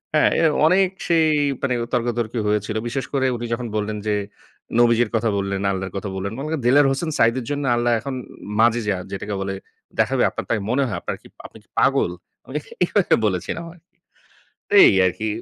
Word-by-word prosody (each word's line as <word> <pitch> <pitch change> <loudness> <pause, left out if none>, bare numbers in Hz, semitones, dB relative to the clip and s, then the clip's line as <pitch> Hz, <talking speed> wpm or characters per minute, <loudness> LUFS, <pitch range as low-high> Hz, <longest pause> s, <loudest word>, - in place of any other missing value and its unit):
হ্যাঁ, 150 - +4
অ্যা 165 - +4 0.2
অনেক 185 +2 +4 0.2
সেই 165 -2 +4 0.3
মানে 130 -3 0 0.2
তর্কাতর্কী 120 -1 -1
হয়েছিল। 105 0 -1
বিশেষ 135 +2 -3
করে 135 -1 +1
উনি 120 0 -5
যখন 120 0 -3
বললেন 105 0 -2
যে, 105 - +2 0.6
"নবীজির 120 -1 +4
কথা 115 0 +1
বললেন, 100 0 -2
আল্লাহর 95 -1 -4
কথা 100 0 -4
বললেন, 100 +2 -3
মানে 140 - -4
ক - - +2
দেলোয়ার 135 +3 +5
হোসেন 160 +4 -2
সাঈদীর 115 +1 +2
জন্য 145 0 -2
আল্লাহ 120 0 +1
এখন 135 0 -5 0.4
মাজেযা 115 -4 +2
যেটাকে 100 +1 -4
বলে 95 0 -3 0.4
দেখাবে - - +2
আপনার - - -6
তাই 110 - +1
মনে 135 +4 +2
হয়? 100 - -3
আপনার - - -4
কি, - - -16 0.2
আপনি - - -11
কি - - -37
পাগল?" - - +3 0.3
আমি 135 - -10
এ - - -12 0.2
এভাবে 200 +1 +2
বলেছিলাম 95 - -3
আরকি। 175 +2 -25 0.7
তে - - +1
এই 95 - +4
আরকি, 95 +5 -3
120 Hz, 185 wpm, -22 LUFS, 105-140 Hz, 0.7 s, দেলোয়ার